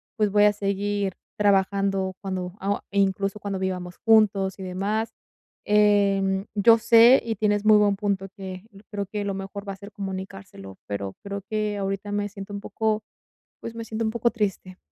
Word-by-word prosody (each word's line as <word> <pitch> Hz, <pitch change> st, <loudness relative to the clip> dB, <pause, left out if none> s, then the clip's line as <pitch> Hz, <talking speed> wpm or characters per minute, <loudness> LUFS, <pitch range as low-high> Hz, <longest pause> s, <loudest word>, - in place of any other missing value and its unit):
pues, 210 Hz, -2 st, +2 dB
voy 205 Hz, +1 st, +5 dB
a 210 Hz, -, +5 dB
seguir 200 Hz, -1 st, -1 dB, 0.2 s
trabajando 195 Hz, -1 st, +1 dB
cuando 185 Hz, -2 st, -4 dB
ah, 200 Hz, +1 st, -1 dB
incluso 195 Hz, 0 st, 0 dB
cuando 200 Hz, -2 st, -4 dB
vivamos 180 Hz, -2 st, -4 dB
juntos 205 Hz, -4 st, +4 dB
y -, -, -6 dB
demás. 200 Hz, +5 st, -2 dB, 0.5 s
Em, 200 Hz, -2 st, +3 dB
yo 225 Hz, +3 st, +6 dB
sé, 230 Hz, +3 st, +7 dB
y 225 Hz, -1 st, -2 dB
tienes 205 Hz, 0 st, +1 dB
muy 215 Hz, 0 st, +7 dB
buen 205 Hz, -1 st, +3 dB
punto 195 Hz, -1 st, -2 dB
que 190 Hz, -2 st, -7 dB, 0.3 s
creo 200 Hz, -1 st, -3 dB
que 205 Hz, +2 st, -4 dB
lo 200 Hz, -1 st, -2 dB
mejor 195 Hz, +1 st, -7 dB
va 195 Hz, -, -3 dB
a -, -, -9 dB
ser 200 Hz, +1 st, -11 dB
comunicárselo, 190 Hz, -, -7 dB
pero 100 Hz, -1 st, -4 dB
creo 200 Hz, 0 st, -5 dB
que 215 Hz, -1 st, -1 dB
ahorita 195 Hz, +1 st, -3 dB
me 205 Hz, 0 st, -1 dB
siento 200 Hz, 0 st, -9 dB
un 200 Hz, -, -4 dB
poco, 220 Hz, 0 st, -1 dB, 0.6 s
pues, 230 Hz, -, -7 dB
me 230 Hz, 0 st, -6 dB
siento 225 Hz, 0 st, -3 dB
un 220 Hz, -, +1 dB
poco 235 Hz, +1 st, +1 dB
triste. 195 Hz, -4 st, -3 dB
200 Hz, 175 wpm, -25 LUFS, 195-210 Hz, 0.6 s, sé